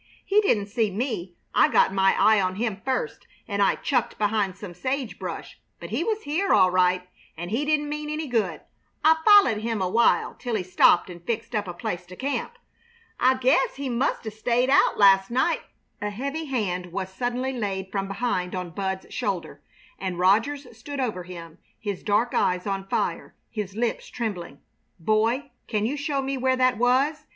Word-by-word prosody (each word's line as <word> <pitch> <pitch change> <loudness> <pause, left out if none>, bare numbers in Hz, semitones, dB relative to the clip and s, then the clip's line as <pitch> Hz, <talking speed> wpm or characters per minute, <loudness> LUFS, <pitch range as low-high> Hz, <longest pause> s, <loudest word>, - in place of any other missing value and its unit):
He 410 +2 +4
didn't 215 - +2
see 220 +1 0
me. 195 -5 -3 0.2
I - - +5
got - - +3
my 195 0 +3
eye 215 -2 +5
on 185 0 -1
him 210 -2 -2
first, 450 - -2 0.2
and 200 -1 -1
I 200 - +4
chucked 250 -5 -1
behind 205 -3 0
some 200 -3 -8
sage 255 +6 -3
brush, - - -6 0.2
but - - -9
he - - 0
was 440 -1 -2
here, 335 +7 0
all 185 -1 +5
right, 180 0 +2 0.3
and 175 +3 -6
he 255 +7 0
didn't 300 -1 +1
mean 300 0 -4
any 305 +1 -3
good. 235 -6 -1 0.4
I 320 +1 +6
follahed 400 - +6
him 225 -1 -2
awhile 190 +6 +2
till 245 -3 -2
he 200 - -1
stopped 185 +1 +4
and 175 -1 -11
fixed 230 +3 -3
up 210 -3 -1
a 175 - -5
place 175 0 -4
to 180 - -10
camp. 285 - -3 0.6
I 260 +1 +4
guess 265 - +2
he 275 -1 -4
must 245 0 -1
'a' 220 - -3
stayed 240 +4 +1
out 280 - +4
last 195 -1 +6
night 260 +8 +1 0.2
" - - -44
A 210 - -1
heavy 280 +9 -4
hand 195 -10 -2
was 190 +1 -4
suddenly 250 +4 -2
laid 195 -5 -3
from 195 -1 -2
behind 195 -3 -2
on 180 -2 -4
Bud's 190 +1 -4
shoulder, 200 -8 -3 0.4
and 185 -2 -3
Rogers 225 +11 +2
stood 280 +5 -7
over 215 -9 -2
him, 170 -3 -10 0.2
his 205 -4 -4
dark 220 +3 +1
eyes 180 0 +1
on 195 -1 -3
fire, - - -2 0.2
his 205 -4 -5
lips 230 +1 -1
trembling. 190 - -5 0.4
"Boy, 225 - +1 0.2
can 215 -2 0
you 260 +6 -1
show 285 -2 -2
me 270 0 -2
where 260 0 +2
that 255 -3 +2
was?" 275 +5 +2
220 Hz, 190 wpm, -25 LUFS, 190-265 Hz, 0.6 s, I